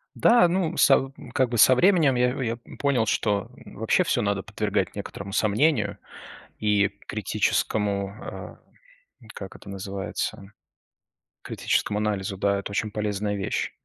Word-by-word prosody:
Да, 235 -7 +5
ну 180 -2 0
са 135 -1 +4 0.2
как 130 -2 +2
бы 120 - -2
со 120 +5 +7
временем 160 -2 +4
я 125 0 +2
я 115 0 -2 0.2
понял, 135 -6 +2
что 100 -1 0 0.2
вообще - - 0
всё - - 0
надо 100 -2 -1
подвергать - - -2
некоторому 100 0 -7
сомнению 110 +10 +1 0.6
и 105 -2 +2 0.2
критическому 100 -1 0
а, - - -8 0.8
как 95 -1 -8
это 100 - -12
называется, 95 +1 -5 0.9
критическому 105 0 -1
анализу, 100 -2 -2
да, 100 0 +1
это 100 - -7
очень 105 +1 -2
полезная 105 -1 -2
вещь. 95 - -2
105 Hz, 130 wpm, -25 LUFS, 100-125 Hz, 0.9 s, со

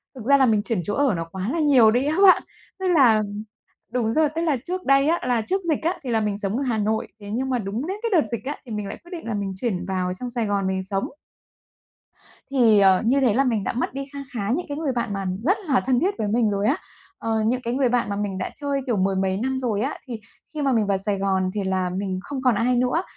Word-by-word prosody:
thực 245 -4 -9
ra 280 +2 +6
là 265 - +4
mình 220 -4 +3
chuyển 225 -5 -1
chỗ 205 - -3
ở 280 -4 +2
nó 165 -1 -3
quá 190 +3 -3
là 335 - -1
nhiều 265 -8 +5
đi 245 +4 +1
á 305 +3 0
bạn. 370 - +7 0.4
Tức 380 - -1
là 230 -7 +5 0.7
đúng 235 -3 0
rồi, 310 +4 +3
tức 330 - -1
là 315 -5 +1
trước 365 +1 -4
đây 275 +1 +4
á, 340 +2 +2
là 240 -2 +2
trước 380 - -1
dịch 300 - 0
á, 335 +3 +1
thì 250 - -3
là 225 -1 +2
mình 210 -2 -1
sống 200 +1 -1
ở - - -1
Hà 240 -4 0
Nội, 215 +1 -1
thế 205 0 -9
nhưng 260 +5 -2
mà 255 - +1
đúng 215 +6 -3
đến 380 +3 -3
cái 460 - -1
đợt 240 - -3
dịch 235 - -3
á 285 +3 -3
thì 235 - -7
mình 210 -2 -3
lại - - -7
quyết 345 - -15
định 335 -6 -7
là 225 - -2
mình 200 -2 -2
chuyển 190 -4 -2
vào 185 -1 -1
trong 245 +6 -6
Sài 235 -2 -1
Gòn 200 -1 0
mình 190 0 -1
sống. 195 +1 -2 1.4
Thì, 235 -6 +5
ờ, 190 -2 +5
như 265 +5 +3
thế 245 -5 +3
là 265 +5 +3
mình 230 -6 0
đã - - -2
mất 245 +1 -2
đi 275 +1 -4
kha 280 - -6
khá 205 -4 -3
những 350 - -4
cái 285 -1 -5
người 305 -3 -1
bạn 235 -4 -2
mà 195 -1 -3 0.2
rất 380 - +3
là 270 -4 +3
thân 255 -1 +1
thiết 385 +7 0
với 215 - -1
mình 225 +1 +2
rồi 200 +1 0
á, - - +2 0.4
ờ, 225 -1 -1
những 250 +3 +1
cái 235 -1 -3
người 260 -1 +2
bạn 245 -3 +1
mà 200 - -2
mình 200 -2 -3
đã 185 - -3
chơi, 280 -1 -2
kiểu, 240 -5 0
mười 190 +1 +1
mấy 190 0 0
năm 260 +4 -1
rồi 225 -5 -1
á, 270 +5 -2
thì 235 -3 -5 0.3
khi 305 - -3
mà 275 -1 +2
mình 225 -4 +2
vào 200 -1 +2
Sài 200 +1 -1
Gòn 190 -1 0
thì 205 - -2
là 190 -1 0
mình 185 0 -3
không 280 -2 -5
còn 250 -3 +3
ai 245 +4 +2
nữa. 250 +8 +1
235 Hz, 285 wpm, -23 LUFS, 200-275 Hz, 1.4 s, bạn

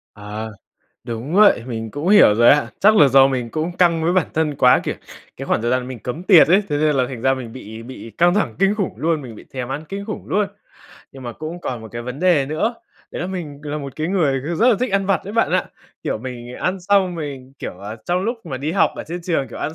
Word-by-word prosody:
Ờ, 105 +2 -7 0.5
đúng 120 +7 -5
vậy, 205 - +5
mình 115 -3 -5
cũng 145 - -4
hiểu 205 - +7
rồi 120 +1 +6
ạ. 145 0 +4
Chắc 215 +2 +5
là 145 -8 +7
do 135 +1 +6
mình 125 -3 -2
cũng 165 +5 -3
căng 170 -3 +3
với 170 +2 +2
bản 185 -3 +2
thân 155 -2 0
quá, 125 -2 +5
kiểu, - - -3 0.4
cái - - -6
khoảng - - 0
thời 120 +1 0
gian 125 0 0
mình 130 -3 -7
cấm 125 +11 -5
tiệt 185 -6 +7
ấy, 190 +5 +5
thế 145 - 0
nên 150 -1 +2
là 130 - +2
thành 125 -4 -7
ra 135 +1 +3
mình 125 -3 -6
bị 110 -2 -9
bị 120 -2 -10
căng 175 +1 +4
thẳng 210 - 0
kinh 195 +1 +3
khủng 200 -5 -2
luôn, 160 -2 0
mình 120 -4 -9
bị - - -13
thèm 130 -1 -4
ăn 145 +4 -4
kinh 200 +1 -5
khủng 215 - -6
luôn. 205 0 +1 0.7
Nhưng 135 -1 -11
mà 120 -1 -5
cũng 160 +6 -7
còn 125 -7 -4
một 110 - -10
cái 120 0 -5
vấn 125 +3 -6
đề 170 -7 +3
nữa, 190 - -1 0.4
đấy - - -5
là - - -3
mình 155 -7 -6
là 150 0 -4
một 140 -2 -8
cái 155 +2 -2
người, 155 -9 +1
kiểu, 170 - -2
rất 235 +7 +4
là 240 - +5
thích 255 -3 -1
ăn 195 -1 +1
vặt 195 - +2
đấy 200 - -7
bạn 230 - +2
ạ, - - +2 0.4
kiểu, - - -2
mình 120 0 -8
ăn 185 +7 -2
xong 190 -1 +2
mình, 140 -5 -7
kiểu, 90 - -7
à 105 +3 -7
trong 180 +1 0
lúc 230 -3 -4
mà 135 - -4
đi 145 +5 -3
học 195 - +3
ở - - -6
trên 175 +2 -6
trường, 160 -6 -1
kiểu, - - -9
ăn 155 - -3
150 Hz, 270 wpm, -20 LUFS, 125-180 Hz, 0.7 s, hiểu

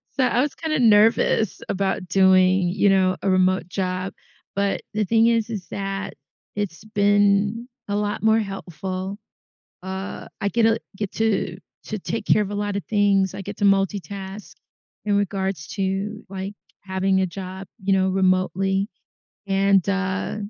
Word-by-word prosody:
So, 265 - +2
I 245 0 +3
was 290 +1 -1
kinda 315 -1 -2
nervous 220 -2 +4
about 190 -1 -1
doing, 185 0 +4
you 200 +2 +2
know, 190 -1 +4
a 195 - +1
remote 185 -1 +2
job, 185 0 -3 0.4
but 200 0 0
the 215 0 0
thing 225 +3 +4
is 230 -1 +2
is 200 -5 -5
that 195 0 -4 0.4
it's 205 -5 -4
been 205 +2 +2 0.2
a 205 - -1
lot 205 0 -1
more 220 0 +4
helpful. 190 -1 -4 0.6
Uh, 190 +1 -6
I 200 - +1
get, 230 0 +2
uh, 225 - +4 0.2
get 205 -2 -4
to 210 -5 0 0.3
to 215 -2 -4
take 225 - -4
care 215 - +4
of 205 0 -3
a - - -3
lot 205 0 -2
of 200 - -2
things. 200 -3 +3
I 195 - -6
get - - -6
to - - -1
multitask 195 0 0 0.5
in 205 -1 +2
regards 195 -4 -2
to, 195 +2 -2
like, 195 +1 -5 0.3
having 190 0 +1
a - - +2
job, 185 +1 -7
you 195 0 +1
know, 190 0 +3
remotely. 190 +1 +1 0.6
And, 195 -1 +3
uh, 195 0 -1
195 Hz, 160 wpm, -23 LUFS, 190-205 Hz, 0.6 s, nervous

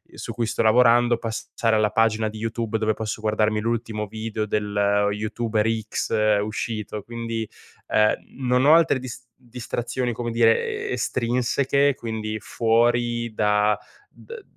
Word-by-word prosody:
su 115 - -6
cui 115 +1 -1
sto - - -1
lavorando 120 +1 +4
passare 115 0 -1
alla 105 -1 +2
pagina 110 -1 +2
di 110 0 -7
YouTube, 115 0 -2
dove 110 0 +1
posso 110 0 -5
guardarmi 110 0 +1
l'ultimo 115 -2 -2
video 110 +1 -4
del 105 -1 +1
YouTuber 110 +1 -1 0.2
X 105 -2 +1
uscito, 105 0 -4
quindi, 115 0 -4 0.4
ehm, 105 0 +3 0.3
non 125 +1 +3
ho 150 - +7
altre 165 -5 +3
dis 125 0 -8
distrazioni, 120 0 -4
come 120 0 -4
dire, 115 -1 +1
e - - -3
estrinseche, 130 +3 +1
quindi 110 -1 -4
fuori 120 0 +1
da 105 0 +2 0.3
d 460 -3 -12
115 Hz, 135 wpm, -23 LUFS, 110-120 Hz, 0.4 s, ho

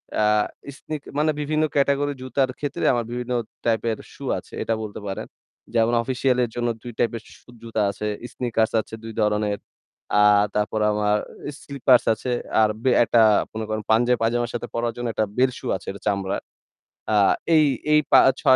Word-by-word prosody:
এ্যা 105 - +2 0.5
sneak 155 -2 -6 0.2
মানে 155 +1 +3
বিভিন্ন 155 +1 0
category 140 0 +2
জুতার 130 +1 0
ক্ষেত্রে 145 -2 -3
আমার 120 -2 -1
বিভিন্ন 125 +1 -4 0.3
টাইপের 115 -1 +1 0.2
সূ - - -12
আছে - - -11
এটা 115 - 0
বলতে 105 -1 -7
পারেন। 95 - -4 0.5
যেমন 115 0 +3
অফিসিয়ালের 125 -1 +1
জন্য 120 0 -1
২ 120 - -7
টাইপের 115 -1 0 0.2
সু - - -25
জুতা 115 -1 -2
আছে, 105 - -6 0.3
স্নিকার্স 115 -3 0
আছে 110 - -18
২ 115 - -6
ধরনের। 105 -1 +1 0.6
আর 105 0 +6
তারপর 105 +1 0
আমার 105 0 +1 0.4
স্লিপার্স 135 -3 +3
আছে 125 +3 -4 0.3
আর 110 - +4
বে 130 - +3
একটা 115 0 +3 0.3
মনে 110 0 -4
করেন 110 0 -2
পাঞ্জাবি 120 +2 +4
পায়জামার 120 +1 0
সাথে 120 0 -4
পড়ার 115 0 -1
জন্য 120 0 -3
একটা 110 - +1
বেল 130 +1 +4
সু - - -12
আছে 90 - -9
এটা 100 - -11
চামড়ার। 100 -1 -1 0.7
আ - - +3 0.4
এই 155 - +6 0.3
এই, 150 - +6
পা - - +9 0.2
ছ - - -18
115 Hz, 170 wpm, -23 LUFS, 110-130 Hz, 0.7 s, পা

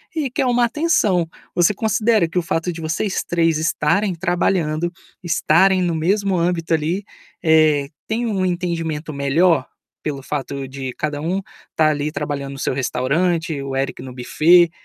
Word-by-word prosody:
e 285 -6 -1
que - - -1
é - - +2
um 245 0 +2
atenção. 225 - +2 0.2
Você 175 +3 +4
considera 215 -2 +2
que 180 +2 -1
o - - 0
fato 165 +1 -2
de 165 - -8
vocês 165 +5 -1
3 165 -2 +1
estarem 170 +4 +1
trabalhando, 175 -1 0 0.3
estarem 180 +3 +3
no 170 -1 0
mesmo 195 +4 +1
âmbito 170 -1 0
ali, 165 +6 0 0.4
eh, 155 -3 +4 0.2
tem 230 +2 -1
um 200 -5 -1
entendimento 165 -4 -2
melhor, 140 +2 +2 0.4
pelo 140 -3 -4
fato 140 -2 -4
de 130 -1 -6
cada 150 -1 -3
um 185 +5 -1 0.3
estar 155 -1 +2
ali 150 0 -2
trabalhando 140 -2 -4
no 135 - -9
seu - - -1
restaurante, 150 +5 0
o 135 -1 -4
Eric 135 +1 -2
no 130 - -8
buffet, 165 +7 +4
165 Hz, 160 wpm, -20 LUFS, 150-185 Hz, 0.4 s, Você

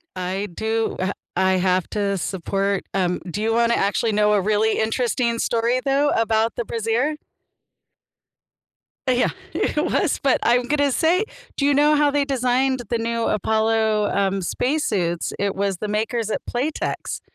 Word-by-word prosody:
I 185 +2 -3
do. 220 +2 -1
I 185 - 0
ha 190 - 0 0.2
I 190 +1 +3
have 185 -1 +1
to 200 -2 -1
support, 195 +2 -1
um, 180 -2 0
do 205 +5 -4
you 225 +1 +1
wanna 235 0 +3
actually 210 +3 +1
know 210 0 +3
a 205 - +3
really 215 +2 +1
interesting 235 +1 0
story 235 +2 +1
though 280 +1 +2
about 225 -1 +1
the 240 - -2
brazier? 230 +7 -1 1.9
Yeah, 250 -1 +2 0.2
it 300 - 0
was, 345 -2 +1
but 275 - +3
I'm 245 +1 +3
going 290 +5 0
to 285 -1 +2
say, 350 - +2 0.3
do 280 - +1
you 285 - +4
know 295 +2 +4
how 295 0 +3
they 285 0 +1
designed 260 -1 0
the 235 - +1
new 230 0 -1
Apollo, 220 0 +1
um, 195 -1 0
space 285 - -1
suits? 175 -5 -1
It 200 -1 -1
was 195 -1 -1
the 210 +3 -4
makers 220 +1 -1
at - - -2
Playtex. 275 +6 -3
225 Hz, 165 wpm, -22 LUFS, 200-255 Hz, 1.9 s, you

